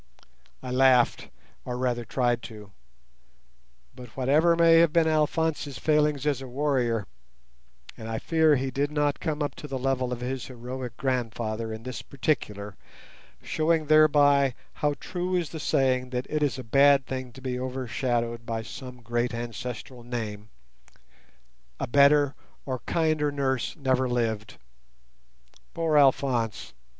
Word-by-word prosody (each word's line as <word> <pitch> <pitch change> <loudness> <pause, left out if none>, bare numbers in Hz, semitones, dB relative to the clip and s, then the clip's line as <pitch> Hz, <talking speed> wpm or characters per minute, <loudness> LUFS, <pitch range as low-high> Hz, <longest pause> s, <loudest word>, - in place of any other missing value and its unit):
I 125 - -5
laughed, 130 -1 +3 0.3
or 125 0 -4
rather 125 -1 -1
tried 120 +1 0
to; 105 -3 -12 1.2
but 125 -1 -10
whatever 150 +6 +3
may 165 -1 +6
have 165 -2 +4
been 165 0 +3
Alphonse's 155 -2 0
failings 150 +1 +1
as 140 -3 0
a 135 - -7
warrior 125 -5 0 0.9
(and 110 - -8
I 110 - -2
fear 160 +2 +3
that 130 - -1
he 135 - -3
did 140 +3 0
not 145 -1 0
come 155 -2 -2
up 145 - -3
to 150 - -8
the 135 -2 -4
level 130 -1 -1
of 120 -1 -4
his 130 +1 -4
heroic 125 -1 -7
grandfather 115 -3 -2
in 110 0 -7
this 130 0 -6
particular, 105 -8 -3 0.7
showing 160 0 +1
thereby 145 -3 +5 0.3
how 150 -1 +1
true 180 0 -3
is 175 -4 -1
the 160 - -6
saying 130 -3 +1
that 125 0 -3
it 155 0 0
is 145 -3 +1
a 130 - -6
bad 140 +3 +4
thing 130 -1 -5
to 130 - -12
be 125 -1 -3
overshadowed 120 -2 -2
by 115 -1 -3
some 125 +3 -10
great 120 +1 -1
ancestral 120 +1 -6
name), 110 -3 -5 1.3
a - - -1
better 140 +2 +4 0.3
or 130 -2 -3
kinder 155 -3 +1
nurse 135 -3 -1
never 130 -3 +1
lived. 110 -4 -2 1.2
Poor 165 -2 0
Alphonse! 130 -5 +2
130 Hz, 145 wpm, -26 LUFS, 120-145 Hz, 1.3 s, may